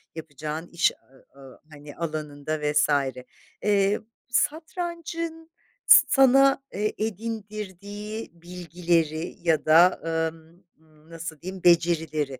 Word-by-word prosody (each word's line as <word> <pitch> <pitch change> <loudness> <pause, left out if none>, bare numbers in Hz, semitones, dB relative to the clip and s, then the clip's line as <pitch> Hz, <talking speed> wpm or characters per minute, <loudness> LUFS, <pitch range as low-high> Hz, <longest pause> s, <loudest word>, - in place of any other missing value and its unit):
yapacağın 155 +1 -6
iş 170 -1 +2
a 135 +1 -24
a 135 -2 -14
hani, 145 0 -12
alanında 155 -2 -4
vs. 150 0 +2 0.7
eee, 200 0 +2 0.3
satrancın 330 +3 -3 0.3
s - - +9
sana, 270 0 +5
eee, 210 +2 -1
edindirdiği 210 -1 -5
bilgileri 170 -2 -2
ya 165 -3 +1
da, 170 +4 +6 0.3
emm, 165 +3 -19 0.5
nasıl 165 -2 -8
diyeyim, 185 +1 -7
becerileri 160 -5 +2
175 Hz, 95 wpm, -25 LUFS, 155-215 Hz, 0.7 s, s